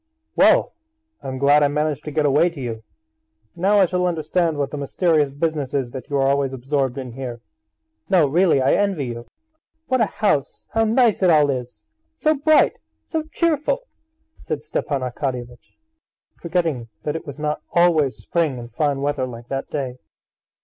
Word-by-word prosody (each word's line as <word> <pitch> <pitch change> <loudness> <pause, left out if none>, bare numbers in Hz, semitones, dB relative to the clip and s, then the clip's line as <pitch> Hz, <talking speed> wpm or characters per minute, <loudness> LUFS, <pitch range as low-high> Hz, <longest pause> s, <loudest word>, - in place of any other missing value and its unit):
"Well, - - +4 0.5
I - - -8
am 130 0 -4
glad 140 +2 +4
I 145 - +5
managed 150 0 -1
to 150 - -4
get 150 0 +1
away 150 +5 +4
to 165 -4 -11
you! 115 -4 -5 0.7
Now 195 +4 +2
I 195 - +6
shall 180 0 0
understand 165 -1 0
what 140 -1 -1
the 150 - -5
mysterious 150 +1 +1
business 145 -1 -2
is 130 -4 -1
that 130 0 -8
you 140 - 0
are 135 0 +2
always 140 -1 +1
absorbed 135 0 -1
in 130 -2 -5
here. 120 -1 -6 0.7
No, 180 -5 +5
really, 160 -2 +3
I 130 - +3
envy 195 -8 +1
you. 120 -1 -6 0.6
What 255 -2 +2
a 220 - +3
house, 190 -12 -1
how 225 0 +2
nice 230 -1 +3
it 185 - +4
all 150 -3 +5
is! 125 -2 -6 0.3
So 310 -1 +2
bright, 310 +2 +3 0.3
so 320 -1 -2
cheerful!" 335 - 0 0.6
said 150 -2 -4
Stepan 145 -2 -2
Arkadyevitch, 125 -1 -5 0.6
forgetting 165 -9 -1 0.2
that 150 - -2
it 165 - -6
was 140 -1 -7
not 150 0 -2
always 165 -6 +3
spring 160 -6 -1
and 120 0 -9
fine 145 -3 0
weather 145 -3 -1
like 120 -1 -10
that 135 0 -3
day. 130 -4 -4
145 Hz, 175 wpm, -22 LUFS, 135-175 Hz, 0.7 s, I